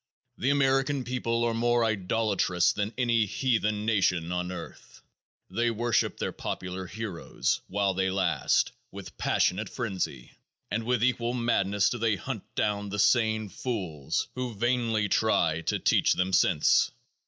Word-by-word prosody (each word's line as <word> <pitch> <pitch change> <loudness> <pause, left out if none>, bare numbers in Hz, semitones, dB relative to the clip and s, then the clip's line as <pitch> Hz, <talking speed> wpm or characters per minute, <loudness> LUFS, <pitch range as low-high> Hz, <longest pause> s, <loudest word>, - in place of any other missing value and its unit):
The 130 - +1
American 135 0 +2
people 120 -2 -1
are 120 -1 +1
more 120 0 +2
idolatrous 100 -4 +1
than 105 +1 -2
any 120 -3 +2
"heathen" 105 -3 0
nation 90 -6 +1
on 90 0 -2
earth. 90 -2 -10 0.5
They 120 +5 +1
worship 115 0 0
their - - -2
popular 90 0 -5
"heroes," 100 -3 -3
while 100 0 0
they 95 0 0
last, 90 -6 +1 0.2
with - - -9
passionate 100 +4 +1
frenzy, 95 - -4 0.4
and 115 +2 -2
with 120 -1 +1
equal 120 -1 +1
madness 105 -4 +1
do 120 - -3
they 110 -2 +2
hunt 90 - -5
down 105 -1 -1
the 100 - -4
sane 110 0 +3
"fools" 90 - -3
who 125 -3 -4
vainly 115 -1 +1
try 85 -7 +2
to - - +1
teach - - +3
them 95 +1 -1
sense. - - +4
110 Hz, 140 wpm, -28 LUFS, 95-120 Hz, 0.5 s, sense